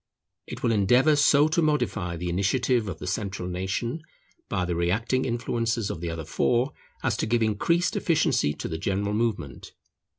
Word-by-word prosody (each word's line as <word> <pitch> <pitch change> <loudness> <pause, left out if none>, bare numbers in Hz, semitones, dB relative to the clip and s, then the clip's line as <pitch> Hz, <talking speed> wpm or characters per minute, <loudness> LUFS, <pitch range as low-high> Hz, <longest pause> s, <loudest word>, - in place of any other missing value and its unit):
It - - -8
will 115 - +3
endeavour 125 +8 +4
so 145 +1 +5
to 165 +2 +2
modify 110 - 0
the 90 +2 -4
initiative 110 +5 +1
of 85 - -5
the - - -8
central 95 -1 -3
nation, 95 - -3 0.5
by 90 - 0
the 90 - -2
reacting 110 +10 0
influences 115 -2 -1
of 80 - -6
the 85 - -3
other 80 -1 -5
four, 120 - +1 0.3
as 120 -5 +1
to - - -1
give 115 0 +2
increased 170 - +1
efficiency 155 - +1
to - - -5
the 80 - -4
general 100 +3 -1
movement. 105 - -3
110 Hz, 170 wpm, -26 LUFS, 90-125 Hz, 0.5 s, so